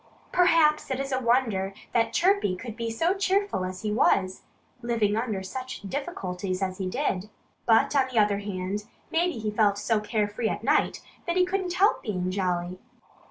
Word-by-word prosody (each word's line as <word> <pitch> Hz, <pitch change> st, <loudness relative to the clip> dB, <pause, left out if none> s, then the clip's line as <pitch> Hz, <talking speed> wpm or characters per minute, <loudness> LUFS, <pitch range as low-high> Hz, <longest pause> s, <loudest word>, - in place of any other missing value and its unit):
Perhaps 330 Hz, -4 st, +4 dB
it 265 Hz, -1 st, -2 dB
is 275 Hz, 0 st, -3 dB
a 260 Hz, -, +1 dB
wonder 230 Hz, -6 st, +1 dB, 0.2 s
that 230 Hz, -1 st, +2 dB
Chirpy 380 Hz, -, +2 dB
could 225 Hz, +3 st, -7 dB
be 230 Hz, 0 st, -3 dB
so 330 Hz, +11 st, +1 dB
cheerful 395 Hz, -, 0 dB
as 185 Hz, +1 st, -5 dB
he 210 Hz, -, -1 dB
was, 190 Hz, -3 st, +2 dB, 0.4 s
living 230 Hz, -4 st, +1 dB
under 220 Hz, -4 st, -2 dB
such 255 Hz, +4 st, -6 dB
difficulties 195 Hz, -, -3 dB
as 185 Hz, 0 st, -3 dB
he 185 Hz, -1 st, -2 dB
did. 210 Hz, -5 st, -2 dB, 0.4 s
But 270 Hz, +6 st, +4 dB
on 270 Hz, -2 st, +4 dB
the 240 Hz, -, -3 dB
other 205 Hz, -2 st, +3 dB
hand, 200 Hz, 0 st, -4 dB, 0.3 s
maybe 345 Hz, +2 st, +2 dB
he 215 Hz, -4 st, -3 dB
felt 210 Hz, -2 st, +2 dB
so 215 Hz, +1 st, +1 dB
carefree 210 Hz, +1 st, -1 dB
at -, -, -4 dB
night -, -, +2 dB, 0.3 s
that 340 Hz, -, 0 dB
he 365 Hz, -, +5 dB
couldn't 365 Hz, -1 st, -2 dB
help 400 Hz, +4 st, +3 dB
being 185 Hz, -4 st, -2 dB
jolly. 180 Hz, -1 st, -2 dB
220 Hz, 175 wpm, -27 LUFS, 195-275 Hz, 0.4 s, he